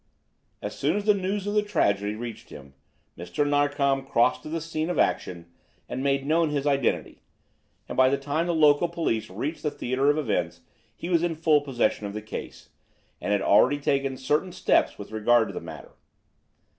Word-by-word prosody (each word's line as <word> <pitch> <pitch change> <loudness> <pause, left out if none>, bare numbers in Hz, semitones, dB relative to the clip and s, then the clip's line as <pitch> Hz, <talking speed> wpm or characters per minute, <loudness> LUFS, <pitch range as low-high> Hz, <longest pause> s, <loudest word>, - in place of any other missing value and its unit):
As - - -4
soon - - 0
as 205 - -3
the 210 - +5
news 195 +1 -2
of 205 - -2
the 210 - +3
tragedy 105 - 0
reached 115 0 -8
him 70 0 -12 0.4
Mr. 85 - -2
Narkom 145 -1 +1
crossed 125 -2 +2
to - - -9
the 165 +1 -2
scene 160 0 -3
of 180 - -2
action 85 -2 0 0.4
and 130 - -4
made 135 0 0
known 160 +2 +2
his 145 -1 -2
identity, 140 -3 0 0.7
and - - -6
by 130 0 +5
the 140 - +1
time 155 +5 -2
the 170 - 0
local 150 +2 +4
police 160 -10 -2
reached 135 - -4
the 150 - 0
theatre 135 0 0
of 145 - +2
events 90 - -2 0.3
he - - -7
was 170 -2 +3
in 170 -1 -1
full 155 -2 +3
possession 120 -6 -1
of 100 - -7
the 105 - -5
case, 110 - -8 0.5
and - - -2
had 100 -1 +1
already 130 +8 +4
taken 140 -2 -1
certain 150 +7 0
steps - - +1
with - - -9
regard 110 +1 +3
to - - -7
the - - -5
matter. - - -10
140 Hz, 195 wpm, -26 LUFS, 115-160 Hz, 0.7 s, the